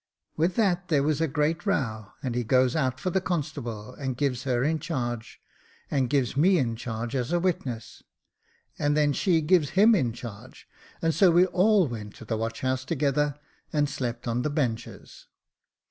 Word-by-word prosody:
With 170 +3 +1
that 190 -4 +1
there 150 -5 +2
was 155 +1 +1
a 160 - +2
great 150 +3 0
row, 110 - -2
and 130 -3 -2
he 120 0 -1
goes 130 +2 +3
out 130 -4 0
for 185 - -2
the 190 - +1
constable, 130 - -4
and 130 -2 -4
gives 135 -2 -1
her 125 -2 +1
in 160 +2 +1
charge, 120 -7 -4 0.5
and 135 -4 +1
gives 135 -4 +1
me 180 +6 +4
in 120 -6 0
charge 115 +1 -4
as 125 +1 -1
a 175 - +2
witness, 125 - -3 0.8
and 145 +1 +1
then 145 -1 +3
she 170 +1 +2
gives 160 0 +2
him 220 +4 +7
in 130 - +2
charge, 120 +1 -10 0.4
and 165 0 +2
so 190 +2 +5
we 175 +2 +5
all 190 0 +3
went 105 -4 -7
to - - -11
the 110 - -2
watch 115 +1 -3
house 130 0 0
together, 145 0 0 0.4
and 145 -1 +2
slept 120 -4 -4
on 120 +1 0
the 150 - -1
benches. 120 -6 -4
140 Hz, 185 wpm, -27 LUFS, 120-165 Hz, 0.8 s, him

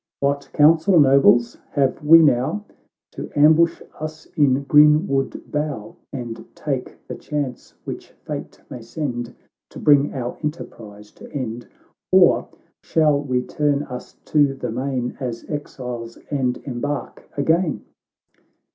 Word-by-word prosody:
" - - -71
What 140 0 -1
counsel, 160 +4 +5
nobles, 135 -4 +5 0.2
have 140 0 0
we 165 +2 +8
now? 145 +9 +1 0.2
— - - -69
To - - -6
ambush 160 +3 +4 0.2
us 155 +1 -7
in 140 -2 +3
green 150 +4 +5
wood 135 -1 -2
bough, 150 +3 -3 0.2
And 120 -4 -6
take - - -5
the - - -5
chance 145 -5 -5
which - - -7 0.2
fate - - -6
may 125 - -8
send 120 -1 -5 0.3
To - - -12
bring 145 -1 +4
our 125 -2 -4
enterprise 105 -9 -7
to - - -14
end, 120 -4 -5 0.4
Or - - +5 0.3
shall 150 -3 +2
we 130 -3 -1
turn 145 0 0
us 125 -3 -9
to 145 -2 +2
the 130 - -4
main 125 0 -3
As 120 -4 -5
exiles, 125 -6 -6
and 130 -3 0
embark 135 0 -5
again 160 +3 +1
140 Hz, 135 wpm, -21 LUFS, 125-150 Hz, 0.4 s, we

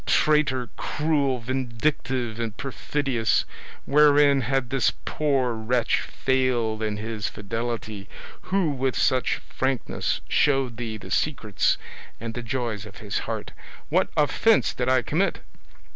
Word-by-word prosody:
Traitor, 140 -5 +2
cruel, 145 -4 0
vindictive, 125 -1 -2
and 115 -3 -3
perfidious, 135 -4 0 0.4
wherein 145 -1 +5
had 130 +1 -1
this 135 -3 +2
poor 135 -5 +1
wretch 115 +2 +1
failed 125 -4 0
in 105 -1 -1
his 110 0 -3
fidelity, 110 -1 -4 0.4
who 185 -5 +2
with 130 -2 -1
such 130 -2 +2
frankness 130 -2 -1
showed 135 -5 +2
thee 115 -2 -4
the 95 -2 -11
secrets 110 -9 +1 0.4
and 115 0 -5
the 125 - -4
joys 115 -3 -3
of 100 - -13
his 105 -2 -3
heart? - - -4 0.4
What - - +2
offence 180 +9 +3
did 125 0 -1
I 130 -1 +3
commit? 185 +6 0
125 Hz, 125 wpm, -25 LUFS, 115-140 Hz, 0.4 s, wherein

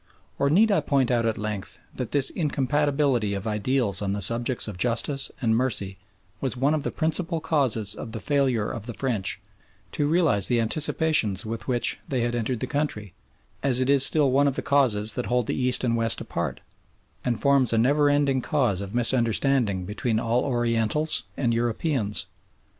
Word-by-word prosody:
Or 140 - +2
need 210 +8 +4
I 200 - +3
point 135 -3 +1
out 115 -2 +1
at 110 - -1
length 105 -2 -5 0.2
that - - -4
this 140 -2 +2
incompatibility 140 - 0
of 100 +1 -6
ideals 105 -1 -1
on 100 -1 -1
the 100 - -3
subjects 115 +4 0
of 100 -4 -7
justice 125 +5 0
and 110 -1 +2
mercy 105 -6 -1 0.4
was 130 -2 -2
one 140 +4 +2
of 155 - 0
the - - -3
principal 165 +1 -1
causes 130 - 0
of 110 - -8
the 110 - -5
failure 130 -7 0
of 115 0 -6
the 120 - -6
French 115 -8 -2 0.5
to 145 - -1
realise 155 - +3
the 120 -1 +1
anticipations 115 - +2
with 115 +1 -5
which 120 -2 0
they 130 -3 -1
had 120 0 -1
entered 120 0 -2
the - - 0
country, 130 - -3 0.5
as 130 -3 +1
it 130 +1 +1
is 140 -2 +6
still 145 -3 +4
one 140 +2 +3
of 135 - -1
the - - -3
causes 115 -7 +2
that 125 - -4
hold 125 -1 +1
the - - -2
East 125 -1 +2
and 115 -2 +1
West 115 -1 0
apart, - - -4 0.6
and 120 -3 -1
forms 140 -3 +2
a 115 - +1
never 140 +6 +3
resting 145 -2 +2
cause 120 -10 0
of 100 +3 -7
misunderstanding 120 -4 +1
between 110 +3 -2
all 115 +2 0
Orientals 120 +3 0
and 120 -4 0
Europeans. 115 -1 -1
125 Hz, 185 wpm, -25 LUFS, 110-140 Hz, 0.6 s, is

